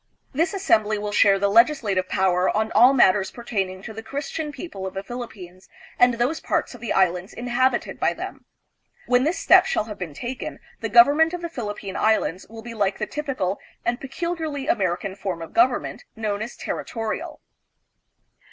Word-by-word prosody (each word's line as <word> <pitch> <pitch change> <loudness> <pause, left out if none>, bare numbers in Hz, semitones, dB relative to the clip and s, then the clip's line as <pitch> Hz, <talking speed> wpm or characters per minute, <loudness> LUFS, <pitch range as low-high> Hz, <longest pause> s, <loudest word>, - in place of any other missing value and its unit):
This 330 +8 0
assembly 215 - +2
will 205 0 -4
share 200 -1 +5
'the 200 +1 +1
legislative 220 -5 +3
power 185 -1 +2
on 220 +1 0
all 250 +2 +7
matters 205 -7 +4
pertaining 195 -5 -4
to 220 - -7
the 225 - -7
Christian 290 +5 -4
people 240 - -7
of 190 - -8
the 195 - -4
Philippines 195 -6 -9 0.3
and 245 -1 +5
those 250 +7 0
parts - - -1
of 245 - -12
the 235 - -4
Islands 180 0 +1
inhabited 245 +1 0
by - - +2
them. - - -7 0.6
When 250 +1 +3
this 330 +5 0
step 375 0 +6
shall 390 - 0
have 210 -1 -9
been 165 -6 -6
taken, 250 - -5 0.2
the - - -3
government 320 0 +6
of 350 - -7
the 340 - -3
Philippine 205 - -5
Islands 215 -4 +1
will 225 0 -10
be 235 0 -7
like 200 -3 0
the 215 - -2
typical 215 -7 -3 0.3
and 240 0 -1
peculiarly 315 -1 -4
American 190 -2 0
form 190 -4 -4
of 165 - -9
government 245 +2 +1
known 215 -2 -2
as 225 +2 -6
territorial. 225 -2 -4
225 Hz, 175 wpm, -23 LUFS, 195-265 Hz, 0.6 s, all